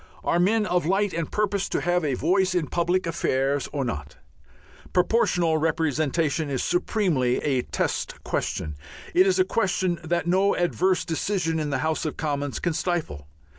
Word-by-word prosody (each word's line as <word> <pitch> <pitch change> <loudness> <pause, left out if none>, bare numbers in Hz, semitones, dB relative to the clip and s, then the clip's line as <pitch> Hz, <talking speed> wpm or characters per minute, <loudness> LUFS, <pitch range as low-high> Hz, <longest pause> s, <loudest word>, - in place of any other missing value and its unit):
Are 170 - +1
men 210 +4 +3
of 180 -5 0
light 195 +1 +1
and 165 -1 -3
purpose 205 -2 0
to - - 0
have 175 0 +1
a 140 -4 0
voice 185 +5 +1
in 175 -3 +1
public 175 +4 0
affairs 140 -3 0
or 140 -3 -2
not? 75 -10 -5 0.8
Proportional 180 -4 +2
Representation 155 -1 0
is 135 -3 -1
supremely 175 - +1
a 135 -4 +1
test - - -2
question. 75 - -2 0.4
It 370 +3 +5
is 380 - +3
a 370 - +4
question 185 - 0
that 170 +1 -1
no 190 +3 +3
adverse 180 +1 +1
decision 165 -1 -1
in 150 -1 -2
the 140 - 0
House 160 0 0
of 155 - -3
Commons 145 -2 -2
can 175 - -1
stifle. 155 - -2
170 Hz, 165 wpm, -25 LUFS, 150-185 Hz, 0.8 s, It